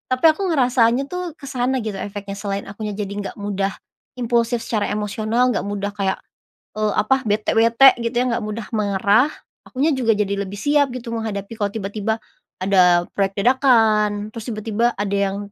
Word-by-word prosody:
Tapi 255 - -1
aku 315 - -8
ngerasanya 250 -4 +3
tuh, 360 0 -3 0.2
ke - - -24
sana 260 -1 -1
gitu 215 -2 -4
efeknya 200 -1 -6
selain 200 -1 -3
akunya 210 +1 -5
jadi 200 -1 -4
nggak 200 - -5
mudah 200 -1 -1 0.5
impulsif 235 0 +1
secara 215 -3 -1
emosional, 215 +3 0
enggak - - -1
mudah 205 0 -3
kayak, 195 -2 -1 0.6
eee, 215 -1 +1
apa, 265 - +2
bete 210 0 +1
bete 230 +4 +6 0.2
gitu 230 - -1
ya, - - +3
enggak 235 -1 -1
mudah 215 +1 -5
marah, 205 +5 +3 0.4
akunya 280 +5 0
juga 245 -3 +2
jadi 200 -1 0
lebih 200 +1 -8
siap 290 +4 +3
gitu 240 -1 -6
menghadapi 215 -2 -4
kalau 205 -1 0
tiba-tiba, 210 +1 -2 0.5
ada 180 -2 +4
proyek 195 -1 0
dadakan, 215 -4 +3
terus 225 -2 -7
tiba-tiba 225 +1 0
ada 200 0 -2
yang 200 0 0
215 Hz, 170 wpm, -21 LUFS, 200-235 Hz, 0.6 s, bete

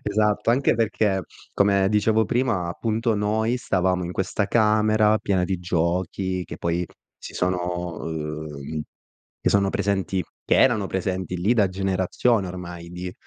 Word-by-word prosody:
Esatto. 105 +1 +1
Anche 130 +1 +3
perché, 105 -3 +1 0.3
come 100 -1 +3
dicevo 110 +2 +3
prima, 115 -8 0
appunto, 115 +4 -1
noi 110 +3 0
stavamo 90 -5 0
in 85 - -4
questa 100 +2 -1
camera 110 -1 +3
piena 95 -4 0
di 95 0 -2
giochi 90 +2 -1
che - - -8
poi 85 +1 -1 0.3
si - - -10
sono 90 -1 -2
uhm, 75 -1 -5 0.6
che - - +2
sono 100 -1 +3
presenti 95 -1 0 0.2
che - - +3
erano 120 -7 +3
presenti 95 -1 -2
lì 95 +6 +2
da 110 -5 +4
generazioni 95 +3 0
ormai 85 -1 -7
di, 90 +1 -6
95 Hz, 140 wpm, -24 LUFS, 90-110 Hz, 0.6 s, da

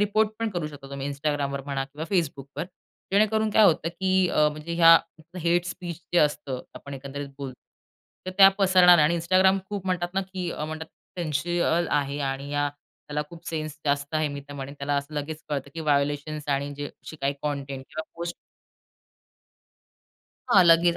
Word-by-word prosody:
Report 210 +1 +3
पण 225 -1 -1
करू 175 -5 -2
शकता 145 -2 -11
तुम्ही 140 0 -4
Instagramवर 140 -1 -2
म्हणा 140 -1 -2
किंवा 145 +3 -7
Facebookवर. 145 -4 -1 0.5
जेणेकरून 215 +2 +3
काय 215 0 +6
होतं, 165 -3 +3
की 185 +1 +1
अ, 150 0 +4
म्हणजे 155 +3 -6
ह्या 165 -1 +8 0.4
हेट 175 +1 +2
स्पीच 175 -2 -6
जे 175 - +5
असतं 145 -4 +1
आपण 140 - -8
एकंदरीत 140 +1 -6
बोलतो, 135 -2 -5 0.7
तर - - -2
त्या 195 -1 +11
पसरणार 185 -2 +7
नाही 155 - +5
आणि 170 +1 +1
Instagram 185 +3 +4
खूप 200 -2 -4
म्हणतात 175 -1 -1
ना, 195 - +2
की 185 -2 -5
अ, 150 - -4
म्हणतात 155 +1 -5 0.3
सेन्सिबल 170 +1 0
आहे 140 -1 0
आणि 135 +1 -5
त्याला 145 +1 -3
खूप 170 -1 -13
सेन्स 155 -2 -3
जास्त 145 +1 0
आहे, 155 -1 +2
मी 145 0 -6
तर - - -7
म्हणेन. 140 0 -6
त्याला 145 +1 -1
असं 140 +2 -4
लगेच 150 +2 -4
कळतं, 140 -2 -3
की 165 - -4
व्हायोलेशन्स 145 0 0
आणि 140 0 0
जे 145 0 -4
अशी 155 - -11
काही 140 +1 +2
कंटेंट 140 -2 -3
किंवा 155 - -5
पोस्ट 170 0 -4 2.1
हां, 190 -6 +7
लगेच 170 +1 +5
155 Hz, 175 wpm, -26 LUFS, 140-175 Hz, 2.1 s, त्या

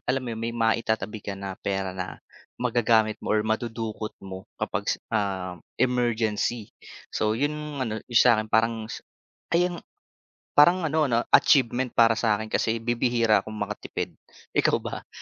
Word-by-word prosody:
alam 130 0 +1
mo 120 - -4
yun 110 - -6
may 115 +1 -3
maitatabi 110 -2 0
ka 100 -1 -5
na 95 0 -5
pera 95 -1 -2
na, 90 0 -5 0.4
magagamit 115 -3 +2
mo 110 - 0
or 105 - +1
madudukot 110 -1 -3
mo, 95 -1 -8
kapag - - -3
s - - +2 0.2
ah, 95 -4 -2 0.2
emergency. 120 -3 0 0.4
So 110 0 0
yun 145 +4 0 0.3
ano 110 -2 -3
yung 120 - -3
sa 120 -3 +5
akin 110 - -6
parang 110 0 +1
s - - -8 0.5
ay, 175 +2 +4
ang 175 -1 -8 0.8
parang 175 +4 +6
ano 155 -1 +2
no 120 -2 +1
achievement 130 -2 +4
para 115 -1 +5
sa 110 -3 +3
akin 110 +1 -6
kasi 115 0 0
bibihira 120 -2 +2
akong 110 - -8
makatipid, 105 0 -4 0.4
ikaw - - +3
ba? - - -7
110 Hz, 160 wpm, -26 LUFS, 105-120 Hz, 0.8 s, parang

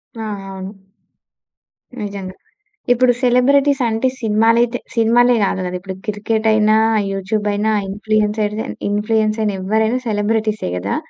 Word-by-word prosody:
ఆ! - - -9 0.3
అవును. 190 +1 -9 1.2
నిజంగా. 195 -2 -6 0.6
ఇప్పుడు 250 0 +3
సెలబ్రిటీస్ 275 +3 +3
అంటే 225 +4 0
సినిమాలైతే 230 +2 +2 0.2
సినిమాలే 240 +2 +4
కాదు 190 - -2
కదా, 180 0 -4
ఇప్పుడు 190 0 -7
క్రికెట్ 220 +2 -1
అయినా, 215 0 +3 0.4
యూట్యూబ్ 205 +2 -2
అయినా 215 +2 0 0.2
ఇన్ఫ్లుయెన్సర్‌గా 210 +1 -1 0.2
ఇన్ఫ్లుయెన్స్‌ర్ 215 +1 0
అయిన 205 -2 0
ఎవ్వరైనా 220 +5 +1
సెలెబ్రెటీసే 215 - -1
గదా! 100 +3 -2
215 Hz, 115 wpm, -18 LUFS, 205-230 Hz, 1.2 s, సినిమాలే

